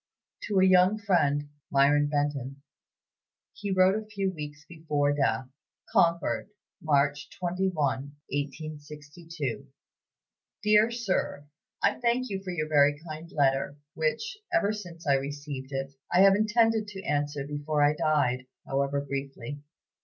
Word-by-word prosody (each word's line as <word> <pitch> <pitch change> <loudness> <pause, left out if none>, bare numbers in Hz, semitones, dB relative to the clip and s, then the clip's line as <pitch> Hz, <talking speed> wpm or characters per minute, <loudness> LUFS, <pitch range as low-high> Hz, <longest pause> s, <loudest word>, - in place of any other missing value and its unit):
To 200 -2 +1
a 185 - +6
young 185 +2 +5
friend 145 -8 +1 0.2
(Myron 145 +1 +4
Benton) 140 -2 -2 0.9
he 205 - -5
wrote 185 0 +4
a 215 - -14
few 200 -3 -2
weeks 150 -2 -8
before 150 -3 0
death: 135 -2 0 0.5
"CONCORD, 170 +3 +2 0.3
March 145 -1 +1
21, 180 +1 -1 0.6
1862. 150 0 -5 1.0
"DEAR 210 +1 +5
SIR, 205 -10 -2 0.4
I - - +2
thank 245 0 +1
you 190 -1 -3
for 190 - -6
your 160 -4 -2
very 145 -1 +4
kind 155 +2 -7
letter, 140 -2 +1 0.2
which, 390 - -2
ever 275 - +2
since 175 -6 -9
I 140 - +4
received 140 0 -4
it, 135 0 -3 0.2
I 180 - +5
have 195 0 +8
intended 220 +1 +2
to 195 -2 -8
answer 145 -5 -1
before 145 +1 -1
I 145 +1 +5
died, 140 -5 +1 0.2
however 140 +1 0
briefly. 140 -1 -5
150 Hz, 130 wpm, -28 LUFS, 145-190 Hz, 1.0 s, have